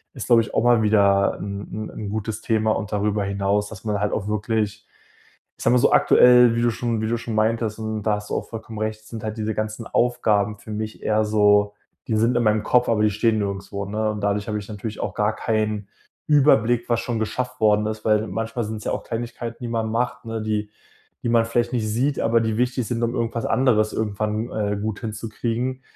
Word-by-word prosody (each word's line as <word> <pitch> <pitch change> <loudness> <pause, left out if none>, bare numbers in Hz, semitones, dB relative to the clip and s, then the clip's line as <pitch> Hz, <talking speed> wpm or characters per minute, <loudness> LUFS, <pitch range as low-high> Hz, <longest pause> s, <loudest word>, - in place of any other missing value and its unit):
Ist, - - -5
glaube 115 -1 +5
ich, 115 - -7
auch - - +2
mal 120 -2 +4
wieder 100 -2 +3
'n 100 0 -5
'n 110 +1 -5
'n 105 -2 -6
gutes 110 0 -4
Thema 110 -1 +1
und 105 -1 -2
darüber 105 0 0
hinaus, 100 +1 0
dass 110 -2 -10
man 105 -2 0
halt 105 - 0
auch 100 - -2
wirklich, 105 0 -1 0.7
ich - - -7
sage - - +4
mal - - +5
so - - +3
aktuell, 125 -1 +6
wie 115 - +1
du 120 - +3
schon 115 -1 -2
wie 110 - -1
du 120 - +1
schon 115 -1 -5
meintest, 110 0 0
und 110 -1 -3
da 105 - +2
hast 105 0 -9
du - - 0
auch - - -5
vollkommen 110 -1 -8
recht, 110 0 -3
es 110 - -18
sind 115 -2 -7
halt 110 +1 -4
diese 110 0 -1
ganzen 110 +2 -4
Aufgaben 105 -4 +1
für 110 - -12
mich 110 +1 -5
eher 110 0 +2
so, 105 -1 +3 0.3
die 110 - +1
sind 115 +3 +2
in - - +1
meinem 110 -1 +2
Kopf, 125 0 +2
aber 110 -2 +2
die 105 - +4
stehen 110 +2 +1
nirgendswo, 100 0 -3
ne? 110 +1 -1
Und 105 -1 -6
dadurch 100 +1 0
habe 105 0 -1
ich 100 - -8
natürlich 105 +1 -6
auch - - -2
gar 105 +1 +1
keinen 105 -2 -1 0.4
Überblick, 120 -5 +3
was 120 -1 +1
schon 120 -2 -3
geschafft 125 +3 -3
worden 105 -1 +4
ist, 110 0 -4
weil 110 0 +3
manchmal 115 +4 -3
sind's 105 0 -6
ja - - -1
auch - - -4
Kleinigkeiten, 120 0 -5
die 120 - -3
man 115 -1 -1
macht, 125 +2 -2
ne, 115 0 -3
die 105 -1 -2 0.5
die - - -2
man 115 -1 +4
vielleicht 120 +1 0
nicht 110 -3 0
sieht, 130 +7 0
aber 115 +1 +3
die 110 -1 -1
wichtig 125 -1 0
sind, 120 -1 -2
um 115 +1 0
irgendwas 115 -1 -2
anderes 110 -5 +2
irgendwann, 110 +2 -2
äh, 105 -1 -1
gut 110 0 -3
hinzukriegen. 115 +3 -3
110 Hz, 230 wpm, -23 LUFS, 105-115 Hz, 0.7 s, aktuell